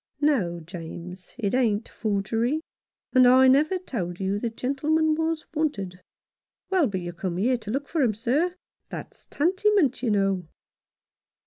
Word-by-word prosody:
"No, 210 - +2
James, 175 +2 -9
it 205 -5 -1
ain't 230 -4 +1
forgery, 225 +6 -1 0.5
and 255 -1 +7
I 260 +1 +7
never 300 +8 +4
told 185 - -4
you 195 +1 -1
the 235 - -1
gentleman 295 +7 +1
was 320 0 -1
wanted." 200 - -2 0.7
"Well, 365 -7 +4
but 190 -4 -3
you 175 0 -5
come 175 0 -3
here 245 +6 +2
to 220 -3 -10
look 275 +5 -2
for 320 - 0
him, 230 -6 +2
sir. 290 - 0 0.3
That's - - -9
tantymint, 375 - +2
you 250 - 0
know." 195 -4 +1
240 Hz, 145 wpm, -26 LUFS, 195-300 Hz, 0.7 s, and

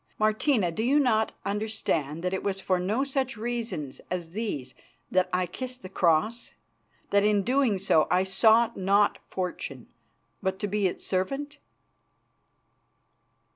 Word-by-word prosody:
Martina, 215 - +2
do 190 - -3
you 270 +6 +3
not 220 -6 +2
understand 200 -7 -1
that 180 +1 -1
it 190 - -1
was 195 -1 -2
for 185 -1 0
no 210 +9 0
such 270 -3 -2
reasons 220 - -4
as 175 -2 -4
these 170 - -4 0.4
that 185 0 +2
I 180 0 +1
kissed 250 +7 -7
the 185 - -7
Cross; 190 +6 +1 0.6
that 200 0 +4
in 210 -1 +3
so - - -6
doing 250 -3 +2 0.3
I 180 +1 +3
sought 220 +4 +4
not 200 +2 +2
fortune, 170 -8 -4 0.6
but 190 0 -1
to 205 - -2
be 205 -1 +1
its 180 - -5
servant?" 275 +10 -2
205 Hz, 140 wpm, -27 LUFS, 185-235 Hz, 0.6 s, that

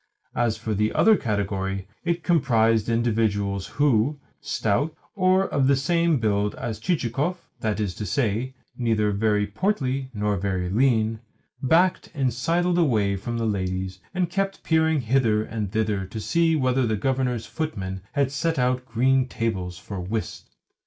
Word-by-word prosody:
As 115 -2 0
for 110 -1 -3
the 105 +1 +1
other 220 -1 +5
category, 100 - -2 0.2
it 170 -1 -1
comprised 115 - +3
individuals 105 -4 0
who, 145 0 +2 0.2
stout, 130 +9 -1 0.2
or 185 -1 +3
of 135 -2 +1
the 140 - +5
same 165 +3 +2
build 105 -3 0
as 110 -2 -4
Chichikov 150 +3 -1 0.2
(that 110 -2 -1
is 100 -4 -1
to 105 +3 -5
say, 120 +3 -1 0.2
neither 110 -4 +1
very 105 0 +1
portly 135 - -1
nor 105 -1 0
very 90 -1 -2
lean), 110 -1 +2 0.4
backed 170 +7 +2
and 130 -4 +1
sidled 175 +7 +1
away 110 -11 +2
from 115 +5 -4
the 115 - -1
ladies, 95 -2 -2
and 180 -2 -1
kept 195 +1 -2
peering 160 -2 +2
hither 115 -3 +2
and 105 -3 -4
thither 105 -3 -1
to 110 - -6
see 165 +7 +2
whether 130 -3 +2
the 110 - +1
Governor's 125 0 -1
footmen 95 - -4
had 140 -2 +1
set 160 +3 -1
out 125 0 0
green 130 +3 +2
tables 95 -7 -3
for 100 +1 -7
whist. 105 +5 -5
115 Hz, 150 wpm, -24 LUFS, 105-140 Hz, 0.4 s, other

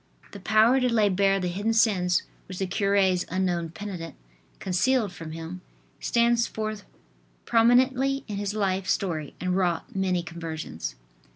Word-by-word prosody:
"" - - -26
The 200 - -9
power 220 +6 +4
to 250 -1 +1
lay 215 -3 +3
bare 195 +1 +2
the 180 - -2
hidden 200 +6 -1
sins 190 -6 +3 0.2
which 185 - -7
the 190 - -1
cure's 190 -1 +2
unknown 175 -2 -1
penitent 170 -2 -7 0.4
concealed 210 +4 +1
from 165 -3 -8
him, 165 +3 -7 0.4
stands 235 0 +2
forth 215 -2 -5 0.6
prominently 260 +4 +3
in 205 -3 -4
his 205 +1 -3
life 190 -2 0
story 160 -6 -1
and 180 0 -1
wrought 180 -2 -1
many 185 -2 0
conversions. 160 - -6
195 Hz, 150 wpm, -26 LUFS, 180-220 Hz, 0.6 s, power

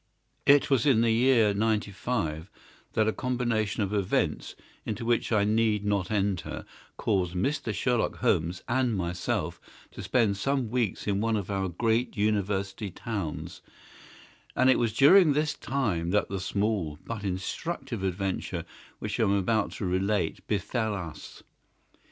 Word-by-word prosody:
IT 140 0 +5
was 135 +2 +3
in 125 -5 +5
the 115 -1 +3
year 115 -3 +4
'95 100 -5 -1 0.4
that 110 -1 +2
a 110 - +2
combination 120 -5 -1
of 100 +1 -3
events, 100 -3 0 0.3
into 110 +2 -4
which 120 0 +1
I 105 -3 +3
need 105 -1 +2
not 100 -3 0
enter, 100 -4 -1 0.3
caused 95 -4 0
Mr. 135 +5 -1
Sherlock 120 +3 0
Holmes 85 +3 0
and 120 -3 +1
myself 90 -1 -2 0.3
to - - -8
spend 110 -6 +1
some 135 0 -1
weeks 120 -6 -1
in 100 -1 0
one 115 0 +1
of 100 0 -4
our 95 -1 -1
great 115 +7 0
University 100 -1 0
towns, 95 -4 -5 0.9
and 130 +1 +5
it - - +3
was 115 -2 +1
during 150 - +6
this 150 +1 +1
time 105 -15 -1
that 105 +3 +1
the 95 - -3
small 95 -4 -1
but 115 -3 -5
instructive 115 - -3
adventure 95 -2 -2 0.3
which - - -4
I - - +4
am 100 - +2
about 100 +2 +1
to 100 - -4
relate 95 -1 -1
befell 110 +1 -1
us. 85 -5 -8
105 Hz, 145 wpm, -28 LUFS, 95-120 Hz, 0.9 s, during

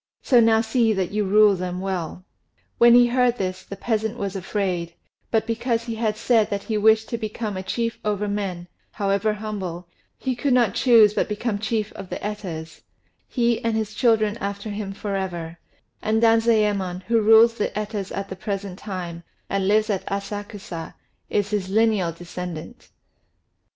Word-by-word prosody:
So 245 - +5
now 225 -1 +5
see 230 -1 +2
that 190 -3 -1
you 210 0 0
rule 210 +1 +5
them 180 0 -4
well." 185 -2 -4 0.5
When 235 0 +8
he 245 0 +7
heard 245 0 +2
this, 185 -2 -3
the 200 - -8
peasant 220 +2 -2
was 200 -3 -3
afraid; 180 -3 -2 0.3
but 220 -1 +1
because 230 0 -1
he 230 -1 -4
had 220 -1 -1
said 225 -2 +2
that 200 -1 -3
he 220 - -3
wished 220 +1 +4
to 235 - -3
become 215 -1 -4
a 185 - -3
chief 230 +4 -2
over 210 -1 -1
men, 195 -4 -3 0.2
however 200 +1 0
humble, 190 -5 -5 0.3
he 260 -1 -2
could 260 +2 +1
not 235 -6 +3
choose 225 -5 +6
but - - 0
become 210 0 -2
chief 215 0 -2
of 195 -2 -9
the - - -4
Etas, 175 -7 -6 0.5
he 235 -2 0
and 230 -1 0
his 215 -1 -3
children 220 -2 +2
after 200 +1 -4
him 205 -1 -4
for 200 0 -4
ever; 175 -3 -4 0.4
and 220 +1 +1
Danzayémon, 210 -5 +2
who 230 +2 +2
rules 225 +2 +7
the 220 - -1
Etas 210 -2 -4
at 195 0 -3
the 190 - -6
present 195 -1 -5
time, 180 -4 -6 0.3
and 195 -1 0
lives 215 +2 +3
at 195 - -1
Asakusa, 200 -3 -5 0.3
is 205 0 0
his 200 -3 -1
lineal 210 -4 +2
descendant. 175 +4 -8
210 Hz, 170 wpm, -23 LUFS, 190-225 Hz, 0.5 s, When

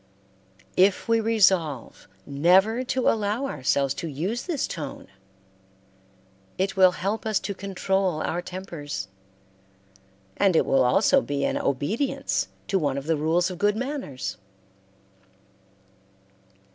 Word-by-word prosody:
If 190 +4 +3
we 230 0 +3
resolve 190 - +1 0.2
never 190 - +3
to 255 0 0
allow 215 +4 +1
ourselves 140 - 0
to 170 - -4
use 175 - -3
this 330 -7 -1
tone, 150 -5 -7 1.5
it 190 +1 -1
will 185 -2 +6
help 200 +5 -2
us 220 -2 0
to 200 - -3
control 190 -3 -1
our 175 - -2
tempers, 165 - -6 1.3
and 190 -3 +3
it - - +4
will 135 -1 +3
also 200 - +4
be 140 - -2
an - - 0
obedience 195 - -1 0.2
to 195 - +2
one 140 -4 -1
of 140 - -5
the 160 +1 +1
rules 165 +4 +1
of 180 - -8
good 205 +1 +2
manners. 260 - -4
185 Hz, 120 wpm, -25 LUFS, 150-215 Hz, 1.5 s, will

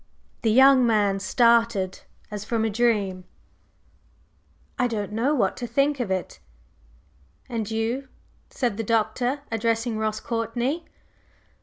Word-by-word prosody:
The 225 - +1
young 265 +2 +6
man 205 -4 +2
started 230 -2 +2 0.3
as 210 -1 -5
from 225 0 -1
a 220 - 0
dream. 205 -5 0 1.6
"I 250 - +3
don't 210 -4 -3
know 245 +8 +1
what 200 -8 +1
to 240 - -4
think 275 +4 +1
of 240 -5 -2
it." 185 -1 -3 1.1
"And 230 -5 -3
you?" 225 +5 -2 0.4
said 240 -6 -2
the 225 - -2
Doctor, 230 +5 0
addressing 225 0 0
Ross 215 0 -1
Courtney. 240 +7 -2
230 Hz, 125 wpm, -24 LUFS, 210-245 Hz, 1.6 s, young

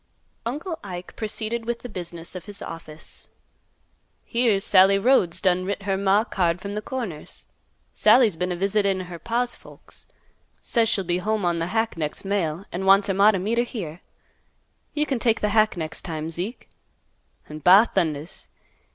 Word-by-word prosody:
Uncle 315 +7 -4
Ike 180 -2 -8
proceeded 220 +1 -3
with 235 0 -3
the - - -5
business 170 -5 -7
of 180 - -7
his 205 -1 -8
office. 155 -2 -9 1.0
"Here's 230 -5 +1
Sallie 195 -1 +6
Rhodes 195 -6 +3
done 185 -2 +2
writ 200 +1 -3
her 195 0 0
maw 195 +1 +3
a - - -5
card 175 -6 0
from 200 +2 -6
th' 210 - -3
Corners. 220 -13 -5 0.5
Sallie's 230 -8 +5
been 180 +2 -2
a - - -1
visitin' 195 0 +1
her 175 -2 -8
paw's 240 +4 -1
folks. - - -11 0.5
Says 230 -2 +1
she'll 195 - +1
be 175 0 -1
home 215 0 -1
on 170 -1 +1
th' 165 +1 -2
hack 225 -1 -1
next 155 +3 -2
mail, 190 -3 -1
an' 185 +2 -3
wants 195 +1 +5
her - - +2
maw 200 +2 +6
t' 210 - +2
meet 215 +6 0
her - - +4
here. 180 -9 -6 0.9
You 300 0 +1
can 270 -5 -1
take 230 -1 +2
th' - - -19
hack 215 -2 +3
next 160 -1 -3
time, 160 -2 -5
Zeke. 185 +9 -5 0.8
An' 155 0 -8
ba 190 +8 +7
thundas! 160 -4 -2
195 Hz, 175 wpm, -24 LUFS, 175-225 Hz, 1.0 s, ba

